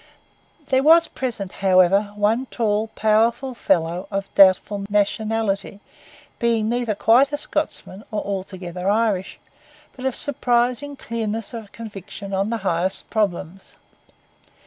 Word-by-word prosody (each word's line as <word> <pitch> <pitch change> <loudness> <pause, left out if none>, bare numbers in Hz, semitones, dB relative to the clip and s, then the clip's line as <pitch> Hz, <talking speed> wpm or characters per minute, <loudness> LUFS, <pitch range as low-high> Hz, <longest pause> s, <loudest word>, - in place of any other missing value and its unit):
There 260 0 +3
was 330 +3 +6
present, 220 -8 -4
however, 195 +2 +4
one 220 +5 +1
tall, 215 -2 0
powerful 225 +5 +2
fellow 175 -4 0
of 195 -1 -4
doubtful 195 +1 +4
nationality, 210 -1 -1 0.6
being 230 -2 +1
neither 235 -2 -1
quite 275 +8 +3
Scotsman 220 -9 -3
nor 215 - -2
altogether 185 -2 -4
Irish, 210 -3 0 0.6
but 260 - -8
of 265 - 0
surprising 250 +1 +1
clearness 225 -2 -4
of 225 -3 -8
conviction 200 -2 -9
on 195 +2 0
the 230 - -1
highest 180 +1 -1
problems. 195 -3 -2
215 Hz, 115 wpm, -22 LUFS, 195-235 Hz, 0.6 s, was